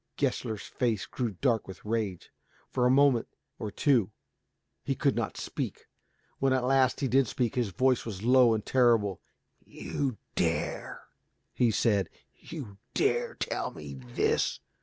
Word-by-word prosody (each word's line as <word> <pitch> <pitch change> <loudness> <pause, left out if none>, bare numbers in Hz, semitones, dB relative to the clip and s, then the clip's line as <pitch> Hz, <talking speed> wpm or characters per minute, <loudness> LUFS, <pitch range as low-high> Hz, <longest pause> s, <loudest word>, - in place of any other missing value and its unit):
Gessler's 120 -6 -1
face 115 -5 -1
grew 125 -3 -2
dark 120 -5 +2
with 95 0 -10
rage. 105 -5 -2 0.4
For 125 -1 +2
a - - +3
moment 135 -3 +4 0.3
or 105 - -3
two 120 -2 +2 0.7
he - - -1
could - - +1
not - - -2
speak. - - -4 0.5
When 135 -1 +3
at 130 -1 +1
last 130 +1 +3
he 135 - +1
did 130 +1 +3
speak, 120 +1 -1
his 120 -5 0
voice 130 +6 +2
was 105 -3 -6
low 125 -1 +6
and 110 - -4
terrible, 115 -7 +3 0.4
"You 135 -6 -3 0.2
dare," - - -2 0.5
he 120 - +3
said, 105 -4 +2 0.2
"you 120 -12 -9 0.2
dare 475 +4 +1
to - - -3
tell - - -2
me 75 - -9
this! 60 -2 0
120 Hz, 150 wpm, -29 LUFS, 105-130 Hz, 0.7 s, low